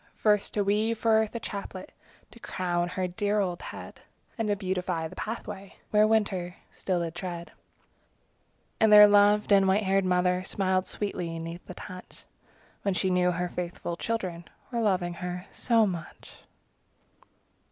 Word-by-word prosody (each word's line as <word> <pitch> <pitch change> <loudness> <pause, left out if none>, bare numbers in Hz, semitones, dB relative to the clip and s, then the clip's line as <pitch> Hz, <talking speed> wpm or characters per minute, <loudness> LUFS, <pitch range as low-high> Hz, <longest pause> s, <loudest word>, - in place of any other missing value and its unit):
First 210 -2 +1
to 205 - +2
weave 215 +3 +1
for 225 +1 +1
Earth 220 +1 -4
a - - -1
chaplet 200 -3 -7 0.4
To 235 - -15
crown 175 -4 -1
her 185 0 -2
dear 205 +3 0
old 180 -3 -1
head; - - -9 0.4
And 225 -2 -2
to 205 - +2
beautify 180 -4 -2
the - - -12
pathway 210 -3 -6 0.2
Where 210 0 +5
winter 195 -5 0 0.2
still 180 -3 -2
did 165 -1 -4
tread. 175 -1 -6 1.3
And 220 -1 +4
their 210 0 +11
loved 205 +1 +4
and 195 -1 +6
white 195 +3 +3
haired 195 0 +2
mother 180 0 +2
Smiled 185 -1 0
sweetly 180 -5 -3
'neath 165 +2 -7
the - - -8
touch, 185 -2 -11 0.6
When 200 -2 0
she 190 0 +1
knew 180 0 +3
her 180 0 -1
faithful 175 -1 -4
children 180 -5 -3 0.3
Were 235 -2 -1
loving 185 -5 +1
her 180 +1 -4
so 230 -3 +3
much. 175 -5 -6
190 Hz, 155 wpm, -28 LUFS, 180-210 Hz, 1.3 s, their